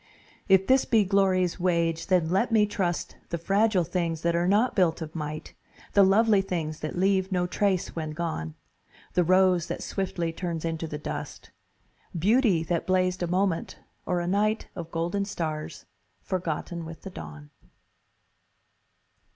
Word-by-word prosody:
If 190 0 +5
this 260 +3 +4
be 225 -3 +3
glory's 190 -2 +2
wage, 170 -2 0
then 175 -4 +2
let 195 +6 +1
me 215 -2 +5
trust 185 -4 -2
The 170 - -2
fragile 195 +2 +2
things 170 -1 -2
that 170 0 +1
are 170 +1 +1
not 215 +6 +3
built 175 -4 +2
of 160 -1 -7
might, 155 -1 -5 0.4
The 200 - +6
lovely 205 +1 +5
things 160 -5 -3
that 155 +3 -5
leave 190 +1 +2
no 180 -1 +1
trace 190 0 0
when 160 -2 -3
gone: 150 - -4 0.6
The 180 - +3
rose 185 0 +3
that - - -4
swiftly 175 -4 -2
turns 170 -2 -4
into 165 0 -3
the 150 - -5
dust, 150 - -7 0.7
Beauty 205 - +3
that 170 0 -2
blazed 185 0 +1
a 175 - 0
moment 185 -1 -1 0.3
Or 180 -1 +1
a 175 - -3
night 210 +4 0
Of 170 -2 -6
golden 170 +4 -1
stars 160 -6 -4 0.4
forgotten 170 -2 -3
with 165 0 -10
the 195 - -7
dawn. 75 - -10
180 Hz, 155 wpm, -27 LUFS, 165-195 Hz, 0.7 s, The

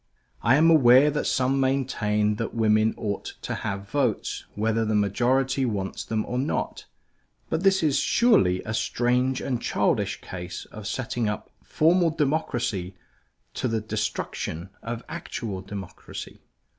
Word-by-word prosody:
I - - +4
am 160 +3 +5
aware 135 -1 +7
that 150 - -1
some 130 +1 +1
maintain 105 -6 +1
that 115 - -4
women 110 -1 +3
ought 100 -3 -4
to - - -3
have 100 0 -4
votes 130 -3 -1
whether 110 +2 +1
the 110 -1 0
majority 125 +6 +2
wants 100 -6 -2
them 110 -1 -2
or 125 - -2
not; 140 +4 -2 0.7
but 160 - 0
this 190 -2 +3
is 145 -3 +3
surely 205 - +3
a 110 - -4
strange 125 +3 +1
and 125 -3 -2
childish 100 -1 0
case 90 0 -7
of 105 -1 -7
setting 115 -1 -2
up 105 - -5
formal 170 +2 +3
democracy 125 - -1 0.6
to - - -1
the 115 -1 0
destruction 105 -4 -3
of 115 +1 -5
actual 115 - -5
democracy. 95 -2 -8
115 Hz, 140 wpm, -25 LUFS, 105-135 Hz, 0.7 s, aware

